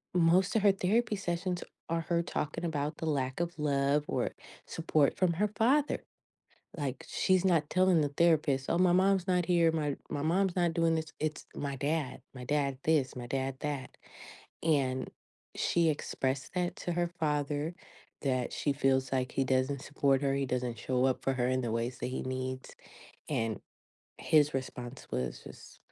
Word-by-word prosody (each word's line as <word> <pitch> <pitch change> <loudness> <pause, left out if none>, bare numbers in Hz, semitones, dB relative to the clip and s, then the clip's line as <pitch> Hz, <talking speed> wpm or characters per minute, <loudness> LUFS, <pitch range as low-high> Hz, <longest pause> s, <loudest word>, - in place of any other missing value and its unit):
most 180 +4 +4
of 220 - +4
her 205 0 +6
therapy 210 +4 +1
sessions 180 -1 -2 0.3
are 165 0 0
her 170 +1 0
talking 165 0 -3
about 150 -1 -2
the - - -4
lack 135 -2 -1
of 170 0 -2
love, 145 -1 +2
or - - -1 0.4
support, 155 -3 +1
from 180 -2 +3
her 205 +6 +1
father. 275 +6 +2 0.7
Like, 140 -4 -3
she's 185 0 +2
not 160 -5 +3
telling 185 -3 +4
the 145 - +1
therapist, 145 -4 +2
"Oh, 170 - +2
my 180 0 +4
mom's 190 0 +3
not 180 -2 +2
here. 170 -2 +4
My 150 -3 -1
my 145 - -2
mom's 185 +3 +2
not 175 -2 +2
doing 165 -1 +2
this. 160 0 -3
It's, 155 0 -2
my 140 -1 -3
dad. 145 +1 -2
My 125 -2 -8
dad, 140 -2 0
this, 150 -6 +2
my 120 -1 -6
dad 135 +1 -2
that," 145 -3 -4 0.7
and, 135 -5 +1 0.4
she 170 -2 +2
expressed 135 0 -2
that 180 -1 0
to 175 - -3
her 175 0 +1
father, 150 +1 0 0.5
that 130 -3 0
she 145 - 0
feels 135 -1 +1
like 130 -1 0
he 135 - +1
doesn't 130 +1 0
support 140 -1 +1
her, 140 -1 +2
he 140 0 0
doesn't 125 -2 -2
show 125 +2 0
up 130 - 0
for 135 - +1
her 125 -1 0
in 130 0 +1
the 115 - -2
ways 115 +2 -2
that - - -3
he 130 - -3
needs 130 0 -4 0.5
and, 115 -1 -1 0.6
his 150 -2 +3
response 130 -1 -5
was 65 0 -3
just, - - -12
150 Hz, 175 wpm, -31 LUFS, 130-170 Hz, 0.7 s, her